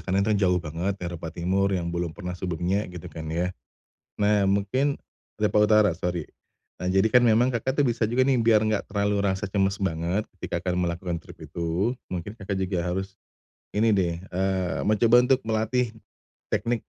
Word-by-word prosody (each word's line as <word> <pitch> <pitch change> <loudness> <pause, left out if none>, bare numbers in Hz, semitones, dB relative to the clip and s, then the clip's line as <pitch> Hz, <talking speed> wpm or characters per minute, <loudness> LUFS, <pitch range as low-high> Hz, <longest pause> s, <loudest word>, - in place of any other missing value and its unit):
karena 95 +2 +1
kan 110 - +3
jauh 90 -3 +3
banget 85 +4 -3
Eropa 85 -2 -5
Timur 95 +4 0
yang 90 -3 -1
belum 85 -1 -2
pernah 90 -3 -5
sebelumnya 90 +3 -1
gitu 90 0 -8
kan 80 - -7
ya. 90 +3 -1 0.7
Nah, 105 -1 +3
mungkin 100 +9 +1 0.5
Eropa 105 0 +3
Utara, 105 -1 +5
sori. 90 -2 -2 0.6
Nah, 90 - -4
jadi 95 +3 +3
kan 125 +1 +6
memang 115 +3 +4
Kakak 130 +5 +1
tuh - - +2
bisa 120 -1 +1
juga 120 +4 +2
nih 135 -2 +3
biar 110 -2 +4
enggak 110 -2 0
terlalu 100 0 +1
rasa 95 +1 0
cemas 95 0 +1
banget, 85 +3 0 0.2
ketika 85 0 -3
Kakak 90 -1 -1
melakukan 85 0 -1
trip - - -14
itu, 85 +8 -1 0.2
mungkin 95 +4 -4
Kakak 100 -1 -3
juga 95 -2 -1
harus 95 +2 -3 0.6
ini 110 +1 +3
deh, 85 -3 +1 0.2
eee, 95 0 0
mencoba 115 +3 +4
untuk 130 0 +3
melatih 110 +2 0 0.6
teknik 115 +1 0
95 Hz, 175 wpm, -26 LUFS, 90-110 Hz, 0.7 s, kan